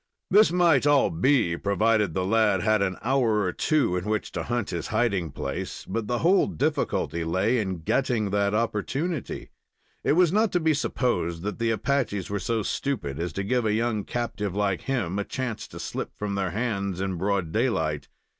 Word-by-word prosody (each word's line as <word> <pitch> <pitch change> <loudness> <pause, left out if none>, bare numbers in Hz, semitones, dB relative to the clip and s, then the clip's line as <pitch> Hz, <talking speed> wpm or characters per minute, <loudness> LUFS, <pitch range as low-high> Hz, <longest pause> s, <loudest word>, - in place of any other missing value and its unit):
This 210 -2 +6
might 170 -6 +4
all 145 -2 +4
be, 90 - +2
provided 105 0 +1
the 95 -1 0
lad 105 -2 +2
had 110 -1 +3
an 95 -1 0
hour 120 -4 +2
or 90 -3 -1
two 145 - +1
in 90 +1 -2
which 110 0 -2
to - - -3
hunt 120 -3 -2
his 85 -3 -3
hiding 100 -9 0
place, 70 0 -5
but 110 +2 -3
the 120 - 0
whole 190 +4 +5
difficulty 145 - -1
lay 95 +9 +1
in 95 -5 -3
getting 115 -2 0
that 100 0 +1
opportunity. 130 - -2 0.5
It - - +3
was 175 +1 +4
not 215 -1 +3
to 180 - +3
be 160 -1 +2
supposed 105 - -1
that 105 +2 -4
the 115 0 +1
Apaches 110 -4 -1
were 100 - -1
so 110 +3 -1
stupid 100 - -2
as 85 0 -2
to 100 - -2
give 125 +4 +1
a 110 -1 +1
young 110 -1 0
captive 105 -5 -3
like 100 -3 0
him 105 -8 -1
a - - 0
chance 125 0 -4
to - - -10
slip - - -5
from 105 -1 -3
their 100 -2 -1
hands 100 -3 -2
in 95 -2 -2
broad 95 -2 -1
daylight. 80 - 0
105 Hz, 190 wpm, -26 LUFS, 95-125 Hz, 0.5 s, This